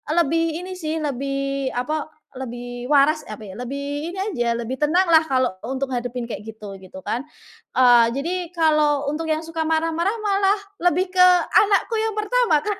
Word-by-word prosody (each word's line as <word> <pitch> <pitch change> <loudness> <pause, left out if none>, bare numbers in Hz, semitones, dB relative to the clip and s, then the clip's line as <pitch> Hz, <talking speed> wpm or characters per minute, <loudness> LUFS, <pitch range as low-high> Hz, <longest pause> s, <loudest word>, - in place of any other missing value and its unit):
lebih 330 +1 +1
ini 370 - -7
sih, 315 -2 -3
lebih 275 0 -2
apa, 295 +6 -2 0.3
lebih 245 -1 -6
waras 300 +2 +3
apa 215 0 -8
ya? 190 -2 -9
Lebih 280 +5 -4
ini 375 - -9
aja 240 - -1
lebih 235 +3 -4
tenang 345 +5 +3
lah 320 -1 +7
kalau 255 -3 +1 0.2
untuk 265 +1 -3
hadapin 245 0 -3
kayak 220 -1 -7
gitu, 210 -3 -9
gitu 190 0 -11
kan? 245 - -2 0.5
Eee, 245 -2 +6
jadi 330 +6 -2 0.2
kalau 305 -3 +2
untuk 320 +2 -3
yang 315 0 0
suka 325 0 -3
marah-marah 330 +5 0
malah 400 0 +2 0.3
lebih 360 +2 +1
ke 365 -1 +6 0.3
anakku 420 +2 +3
yang 440 -1 -1
pertama, 425 -7 +2
Kak. 415 -1 -2
300 Hz, 170 wpm, -22 LUFS, 250-340 Hz, 0.5 s, lah